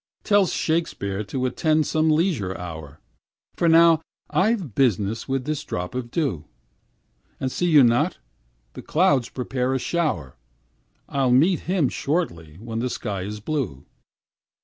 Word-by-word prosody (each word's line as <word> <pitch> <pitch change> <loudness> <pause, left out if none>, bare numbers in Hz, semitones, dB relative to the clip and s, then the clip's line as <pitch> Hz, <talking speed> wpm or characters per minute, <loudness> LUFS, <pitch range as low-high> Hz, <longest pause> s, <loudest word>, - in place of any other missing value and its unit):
Tell 205 -3 +4
Shakespeare 105 - -1
to 130 +5 -3
attend 155 +4 +1
some 155 +2 +1
leisure 155 - +1
hour, 80 -4 -8 0.6
For 170 - +2
now 165 0 +6 0.3
I've 190 - +1
business 110 -3 +1
with 135 -1 -1
this 150 -1 -2
drop 90 0 -4
of 125 -1 -4
dew, 120 - -2 0.9
And 130 - -2
see 175 - -1
you 150 -5 +7
not, 120 0 +2 0.6
the - - -8
clouds 145 -7 +2
prepare 130 0 -2
a - - 0
shower 130 - -2 0.7
I'll 135 -2 0
meet 160 +9 +4
him 180 -7 +2
shortly 85 - -2
when 115 +4 -6
the 125 +2 -1
sky 100 -6 -4
is 105 +3 -5
blue. 115 - -3
130 Hz, 140 wpm, -23 LUFS, 105-160 Hz, 0.9 s, you